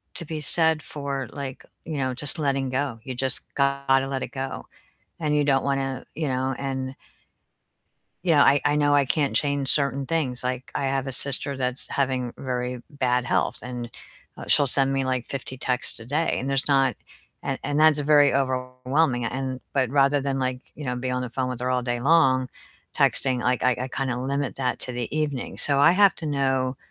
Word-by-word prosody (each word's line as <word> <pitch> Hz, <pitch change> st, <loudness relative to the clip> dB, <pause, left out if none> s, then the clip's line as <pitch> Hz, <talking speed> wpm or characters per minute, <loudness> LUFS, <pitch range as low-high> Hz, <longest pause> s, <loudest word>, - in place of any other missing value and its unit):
to 170 Hz, -, -4 dB
be 155 Hz, 0 st, -5 dB
said 160 Hz, +1 st, +5 dB
for, 140 Hz, -3 st, -5 dB
like, 135 Hz, -2 st, -7 dB, 0.2 s
you 155 Hz, -2 st, -5 dB
know, 130 Hz, -2 st, -1 dB
just 140 Hz, +5 st, -1 dB
letting 135 Hz, -3 st, -1 dB
go. 130 Hz, -2 st, -2 dB
You 130 Hz, -1 st, -6 dB
just 130 Hz, 0 st, +5 dB
gotta 140 Hz, -1 st, +1 dB
let 135 Hz, -1 st, -3 dB
it -, -, -4 dB
go. 135 Hz, -1 st, -6 dB, 0.5 s
And 150 Hz, -2 st, 0 dB
you 145 Hz, -, +2 dB
don't 135 Hz, -2 st, +2 dB
wanna, 135 Hz, -2 st, -2 dB
you 155 Hz, -2 st, -2 dB
know, 130 Hz, +1 st, -1 dB
and 130 Hz, -1 st, -4 dB, 1.3 s
you 180 Hz, -, +2 dB
know, 150 Hz, -, +4 dB
I 140 Hz, 0 st, +4 dB
I 145 Hz, 0 st, +2 dB
know 145 Hz, -1 st, +2 dB
I 140 Hz, -1 st, +3 dB
can't 140 Hz, +1 st, 0 dB
change 140 Hz, -2 st, +1 dB
certain 140 Hz, -1 st, +3 dB
things. 130 Hz, -5 st, -1 dB
Like, 125 Hz, 0 st, -4 dB
I 140 Hz, -, -1 dB
have 135 Hz, 0 st, -1 dB
a -, -, -3 dB
sister 140 Hz, +1 st, +5 dB
that's 130 Hz, 0 st, -3 dB
having 130 Hz, -3 st, -1 dB
very 125 Hz, -1 st, -4 dB
bad 125 Hz, -4 st, 0 dB
health, -, -, 0 dB
and, 125 Hz, -1 st, -6 dB, 0.5 s
uh, -, -, -8 dB
she'll 145 Hz, -, +4 dB
send 135 Hz, +1 st, +3 dB
me, 135 Hz, -1 st, -1 dB
like, 130 Hz, -2 st, -2 dB
50 130 Hz, -1 st, -6 dB
texts 125 Hz, -1 st, 0 dB
a 115 Hz, -, -11 dB
day, 150 Hz, +6 st, -1 dB
and 135 Hz, -, -4 dB
there's 135 Hz, -1 st, -1 dB
not 135 Hz, -2 st, +2 dB, 0.5 s
and -, -, -2 dB
and 145 Hz, +1 st, -1 dB
that's 155 Hz, -1 st, +5 dB
very 145 Hz, -1 st, +4 dB
overwhelming. 130 Hz, 0 st, 0 dB
And 130 Hz, +2 st, -4 dB
but 130 Hz, -4 st, +1 dB
rather 140 Hz, +1 st, +3 dB
than, 135 Hz, 0 st, -2 dB
like, 130 Hz, -1 st, -2 dB
you 150 Hz, -, -8 dB
know, 125 Hz, -1 st, -2 dB
be 125 Hz, +1 st, -3 dB
on 125 Hz, 0 st, -2 dB
the 125 Hz, -, -5 dB
phone 130 Hz, +1 st, -3 dB
with 125 Hz, -1 st, -5 dB
her 125 Hz, -, -1 dB
all 125 Hz, 0 st, 0 dB
day 120 Hz, -1 st, -3 dB
long, 130 Hz, -4 st, +3 dB, 0.4 s
texting, 130 Hz, -2 st, +2 dB
like, 125 Hz, 0 st, 0 dB
I 125 Hz, -1 st, +3 dB
I 130 Hz, -, -3 dB
kinda 130 Hz, -2 st, -2 dB
limit 140 Hz, +1 st, -2 dB
that 130 Hz, -2 st, -2 dB
to 125 Hz, -, -3 dB
the 120 Hz, +2 st, -5 dB
evening. 145 Hz, -4 st, -3 dB
So 140 Hz, -1 st, +2 dB
I 145 Hz, +4 st, +6 dB
have 200 Hz, +1 st, +4 dB
to 165 Hz, -, -7 dB
know 135 Hz, -3 st, -1 dB
135 Hz, 205 wpm, -24 LUFS, 130-140 Hz, 1.3 s, I